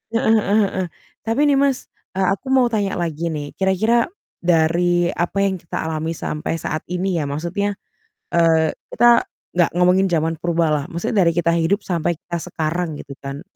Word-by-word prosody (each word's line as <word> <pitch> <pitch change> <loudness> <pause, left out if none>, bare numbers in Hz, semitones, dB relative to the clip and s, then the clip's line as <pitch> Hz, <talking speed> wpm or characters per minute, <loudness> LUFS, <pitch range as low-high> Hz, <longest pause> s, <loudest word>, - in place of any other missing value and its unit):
Heeh 225 -2 +3
heeh 205 +2 +2
heeh. 185 -2 -2 0.4
Tapi 225 +6 +1
nih, 275 - +4
Mas, 275 -2 +1 0.3
e - - 0
aku 195 +8 0
mau 260 -2 +4
tanya 200 -2 0
lagi 170 -1 -2
nih, 145 -2 -5
kira-kira 220 - +2 0.3
dari 175 +1 +2
apa 175 +3 -1
yang 190 -1 0
kita 165 - -6
alami 160 +1 -2
sampai 155 +2 -3
saat 155 0 -3
ini 180 0 -1
ya, - - -2
maksudnya, 175 +7 -2 0.6
eee, 165 -2 +3 0.2
kita 240 +1 +5 0.3
nggak 175 -1 +3
ngomongin 180 +2 +4
zaman 165 -1 0
purba 170 -1 +1
lah, 145 -1 0
maksudnya 180 +4 0
dari 170 - +4
kita 170 0 +2
hidup 170 +5 +1
sampai 170 -2 -1
kita 170 +1 -5
sekarang, 160 -1 -2
gitu 140 - -10
kan. 140 +1 -6
175 Hz, 175 wpm, -20 LUFS, 160-195 Hz, 0.6 s, kita